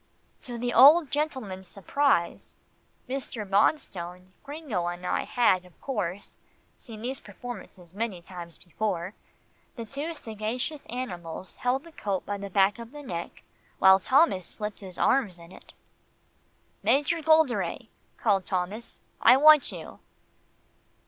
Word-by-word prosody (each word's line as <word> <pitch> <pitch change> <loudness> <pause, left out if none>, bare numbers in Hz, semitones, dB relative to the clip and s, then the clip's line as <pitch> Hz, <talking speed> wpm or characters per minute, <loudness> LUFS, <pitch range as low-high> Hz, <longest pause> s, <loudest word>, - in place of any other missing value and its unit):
To 240 -2 -6
the 245 +1 -2
old 290 +5 +8
gentleman's 260 -11 -3
surprise 200 - 0 0.5
Mr. 255 -5 -5
Bonstone, 185 - 0
Gringo 285 - -4
and 175 +1 -5
I - - 0
had, 210 -7 +3
of 180 -1 -20
course, 205 -7 -4 0.4
seen 220 -2 -10
these 260 +2 -3
performances 190 -7 -10
many 205 -3 -3
times 170 -1 -10
before 185 0 -3 0.6
the 230 -3 -6
two 290 +7 -5
sagacious 235 +5 -4
animals 185 -8 -6
held 255 +3 0
the 335 - -14
coat 200 - -3
by 205 0 -3
the 200 0 -6
back 195 +3 +3
of 235 +3 -10
the 295 0 -9
neck, 175 -9 -6 0.3
while 190 0 +7
Thomas 260 - +3
slipped 210 -1 -6
his 190 -3 -7
arms 225 -10 +2
in 170 +1 -14
it. - - -15 1.1
"Major 280 - +2
Golderay," 315 -5 +2 0.3
called 195 -4 +1
Thomas, 195 +5 -4 0.2
"I 255 - +7
want 305 0 +7
you." - - -9
215 Hz, 130 wpm, -27 LUFS, 185-270 Hz, 1.1 s, old